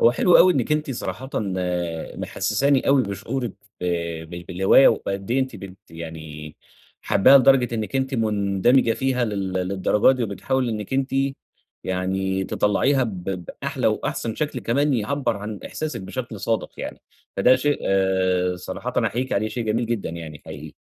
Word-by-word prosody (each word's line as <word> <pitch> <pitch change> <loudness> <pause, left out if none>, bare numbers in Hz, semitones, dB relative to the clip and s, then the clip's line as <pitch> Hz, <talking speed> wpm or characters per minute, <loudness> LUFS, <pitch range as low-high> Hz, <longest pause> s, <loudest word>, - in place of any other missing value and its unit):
هو 115 - +6
حلو 175 +8 +5
أوي 185 0 +7
إنِك 135 +2 0
أنتِ 150 -2 0
صراحةً 130 +1 -5 0.3
آآ، 90 -3 -3
محسساني 135 +5 0
أوي 135 -1 +5
بشعورِك 115 +4 -4 0.3
ب - - -4 0.5
ب 85 0 -7
بالهواية 95 +9 +5
وبقد 100 +2 -2
إيه 135 +2 +2
أنتِ 130 -4 -3
بت 95 -1 -10
يعني 80 -2 -8 0.5
حاباها 135 +8 +6
لدرجة 130 -2 +4
إنِك 110 +4 -2
أنتِ 130 0 -1
مندمجة 110 +2 +2
فيها 130 -1 0
لل 100 -3 -3
للدرجة 95 +6 +2
دي، 125 - -2
وبتحاولي 125 +4 -1
إنِك 105 +1 -5
أنتِ 135 0 0 0.7
يعني 95 +1 -1
تطلّعيها 130 +9 +2
ب 95 -6 -6
بأحلى 90 -3 -3
وأحسن 115 -2 -1
شكل 150 -5 -3
كمان 140 +4 +1
يعبّر 120 0 -1
عن 105 0 -6
إحساسِك 155 -6 -4
بشكل 110 +2 -6
صادق 115 +4 -1
يعني - - -6 0.4
فده 130 +1 +5
شيء 145 +3 0 0.7
صراحةً 90 - -6
أحييكِ 130 +3 -2
عليه، 110 +2 +1
شيء 120 -1 -4
جميل 115 +2 0
جدًا 115 -7 -2
يعني 80 -3 -8
حقيقي. 75 +1 -8
110 Hz, 150 wpm, -23 LUFS, 95-130 Hz, 0.7 s, أوي